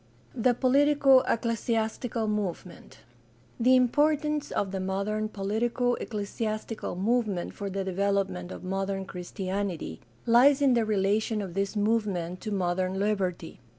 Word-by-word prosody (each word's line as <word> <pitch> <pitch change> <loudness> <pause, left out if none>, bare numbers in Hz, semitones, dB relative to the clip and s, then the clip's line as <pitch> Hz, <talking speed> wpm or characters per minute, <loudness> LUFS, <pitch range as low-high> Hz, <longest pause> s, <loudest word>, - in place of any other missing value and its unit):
THE 245 0 +2
POLITICO 275 +1 +5
ECCLESIASTICAL 230 0 -1
MOVEMENT 200 -4 -4 0.6
The 255 +2 +5
importance 295 +4 +2
of 195 - -1
the 195 - -3
modern 200 +3 -2
poKtico 230 +5 0
ecclesiastical 215 0 -4
movement 205 -2 0
for 200 -1 -5
the 195 0 -2
development 190 -1 -1
of - - -8
modern 195 +1 -2
Christianity 185 - -4 0.2
lies 255 +4 +6
in 275 -3 +4
the 235 -2 +2
relation 215 +1 +1
of 190 -4 -5
this 195 +2 -2
movement 205 -5 0
to 215 - -5
modern 185 -1 -1
liberty. 195 -5 -2
210 Hz, 120 wpm, -28 LUFS, 190-235 Hz, 0.6 s, lies